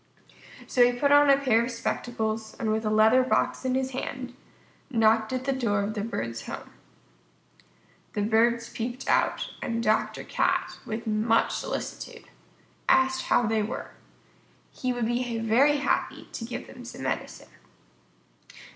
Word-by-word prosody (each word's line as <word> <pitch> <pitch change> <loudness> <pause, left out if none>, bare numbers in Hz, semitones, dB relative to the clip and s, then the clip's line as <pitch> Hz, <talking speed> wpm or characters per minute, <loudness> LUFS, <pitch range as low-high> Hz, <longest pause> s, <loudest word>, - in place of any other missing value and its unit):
So 250 - +4
he 245 0 +3
put 285 +1 +3
on 290 0 +7
a 275 - +7
pair 245 -5 +3
of 240 - -3
spectacles, 220 -2 -3
and 220 -2 0
with 220 +1 0
a - - +2
leather 220 +4 +5
box 255 - 0
in 255 0 0
his 265 0 -1
hand, 255 -1 -5 0.6
knocked 225 -2 +3
at 255 0 -2
the 275 +1 0
door 220 -6 0
of 210 +2 -3
the 210 - -3
Bird's 115 - -4
home. - - -7 1.4
The 205 - -1
Birds 230 +2 +2
peeped 240 +3 -5
out, - - +1
and 230 0 -2
Dr. 215 0 +1
Cat, - - 0
with 225 +2 -4
much 220 +1 +2
solicitude, - - -5 0.6
asked 265 0 +3
how - - +3
they 220 0 +1
were. 210 - -5 0.8
He 255 - -2
would 245 -2 -1
be 240 0 -1
very 240 +7 +3
happy 285 - -1
to - - -5
give - - -6
them - - -12
some - - -8
medicine. - - -4
235 Hz, 155 wpm, -27 LUFS, 220-255 Hz, 1.4 s, on